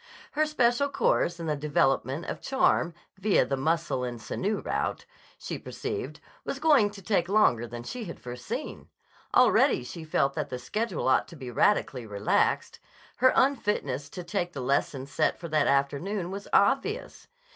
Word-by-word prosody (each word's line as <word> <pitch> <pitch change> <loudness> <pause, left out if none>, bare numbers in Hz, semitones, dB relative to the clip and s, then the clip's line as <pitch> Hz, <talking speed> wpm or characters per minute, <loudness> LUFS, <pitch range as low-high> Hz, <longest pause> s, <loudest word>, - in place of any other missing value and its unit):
Her 310 +1 +1
special 280 -2 +2
course 230 -10 +1
in 165 - -4
the 155 -1 0
development 145 0 0
of - - -5
charm, 265 -10 +2 0.2
via 200 -8 +3
the 135 - -1
muscle 160 -1 0
and 120 -1 -4
sinew 200 - -2
route, - - -2 0.3
she - - -5
perceived, - - -5 0.2
was - - -4
going 285 -10 +4
to 200 -1 -12
take 180 -3 +1
longer 125 - +3
than 120 +1 -7
she 235 - -6
had 170 - -8
foreseen. 125 0 -6 0.5
Already - - +5
she 160 +6 -8
felt 140 -3 +1
that - - -3
the 125 - -4
schedule 210 - -2
ought 130 - +3
to - - -12
be 130 -5 -7
radically 130 - +1
relaxed. 100 0 0 0.4
Her 255 +1 +5
unfitness 205 - +1
to 180 - -7
take 175 -1 -2
the - - -5
lesson 135 +1 0
set 140 - 0
for 170 - -6
that 155 -1 +2
afternoon 170 +8 0
was 200 +1 -6
obvious. 275 - +1
170 Hz, 165 wpm, -28 LUFS, 135-210 Hz, 0.5 s, Already